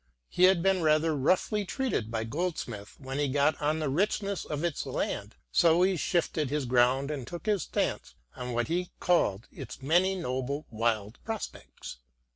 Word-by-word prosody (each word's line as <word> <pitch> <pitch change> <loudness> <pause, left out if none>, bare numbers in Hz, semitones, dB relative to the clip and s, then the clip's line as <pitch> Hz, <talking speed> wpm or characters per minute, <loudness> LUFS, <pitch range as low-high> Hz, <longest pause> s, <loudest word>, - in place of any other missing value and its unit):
He 180 - +4
had 185 -2 +4
been 190 -1 +3
rather 155 0 +3
roughly 185 - +1
treated 180 - -2
by 115 -1 -2
Goldsmith 120 - -4
when 135 0 -5
he 145 - +2
got 145 +3 +1
on 150 +1 +1
the 155 -2 -1
richness 200 +6 0
of 150 +1 -4
its 170 -4 -2
land, - - -3 0.2
so 170 - +5
he 190 0 +3
shifted 160 -4 0
his 145 -1 -1
ground 125 +3 +3
and 135 -5 -5
took 175 +3 -7
his 210 -4 +2
stand - - -1 0.4
on 125 -1 -5
what 120 0 0
he 175 +2 -1
called 120 - +2
its 130 0 -9
many 180 +6 +3
noble 140 -3 -3
wild 110 -1 -1
prospects. 220 - -6
150 Hz, 170 wpm, -29 LUFS, 130-180 Hz, 0.4 s, so